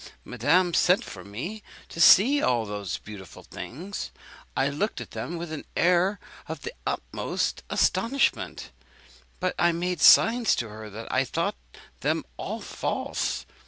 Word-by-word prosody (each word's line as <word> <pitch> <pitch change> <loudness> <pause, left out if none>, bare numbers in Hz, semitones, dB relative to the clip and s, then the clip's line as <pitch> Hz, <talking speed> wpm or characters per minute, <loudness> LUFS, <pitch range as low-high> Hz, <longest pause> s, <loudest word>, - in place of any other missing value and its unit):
Madame 165 +9 +2
sent 180 +3 +3
for 90 - -9
me 145 - -6 0.3
to 165 - -5
see 255 - +7
all 120 -3 +2
those 100 -3 -4
beautiful 100 -5 -11
things. 180 +11 -7 0.5
I 135 - +3
looked 150 +10 -2
at - - -8
them 175 - -5
with 165 -1 -6
an 155 - -5
air 180 +3 +3 0.3
of - - -6
the 465 - -5
utmost - - -2
astonishment; 270 +4 +1 0.7
but 185 -1 0
I 175 0 +4
made 175 -1 -2
signs 230 +6 +6
to 115 - -3
her 110 0 -9
that 110 +3 -8
I - - +3
thought - - -2 0.4
them - - 0
all - - -5
false. - - -3
170 Hz, 145 wpm, -26 LUFS, 115-190 Hz, 0.7 s, see